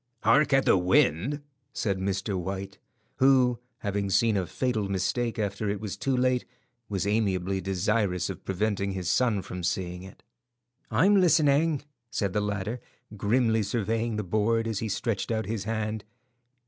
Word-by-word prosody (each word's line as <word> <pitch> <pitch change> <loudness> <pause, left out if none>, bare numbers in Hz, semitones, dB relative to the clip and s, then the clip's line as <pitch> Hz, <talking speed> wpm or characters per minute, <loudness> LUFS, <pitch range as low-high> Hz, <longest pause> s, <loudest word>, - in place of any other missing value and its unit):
"Hark 135 +7 +4
at 135 0 +4
the 95 - +5
wind," 95 - +2 0.3
said 100 -4 -1
Mr. 95 +1 -1
White, 95 +2 -4 0.4
who, 130 -3 +4 0.2
having 100 -1 -1
seen 115 +2 +3
a 95 -3 0
fatal 110 -4 -1
mistake 115 +5 -1
after 105 0 -2
it 100 0 -2
was 105 -3 -5
too 135 -2 -1
late, 125 0 +2 0.5
was 100 -2 -1
amiably 95 -3 0
desirous 95 -1 0
of 95 -4 -7
preventing 100 0 -1
his 90 -2 -1
son 115 -7 +2
from 90 +1 -6
seeing 90 0 -2
it. 95 +1 -13 0.7
"I'm 190 - +4
listening," 155 -3 +3 0.3
said 100 -5 -1
the 105 - +1
latter, 105 +3 -2 0.4
grimly 110 +2 +2
surveying 115 +2 -1
the 105 - -2
board 110 +4 +1
as 110 -3 -2
he 110 - -3
stretched 105 0 -2
out 110 -1 -1
his 105 -2 -3
hand. 110 -1 -2
105 Hz, 155 wpm, -27 LUFS, 95-120 Hz, 0.7 s, the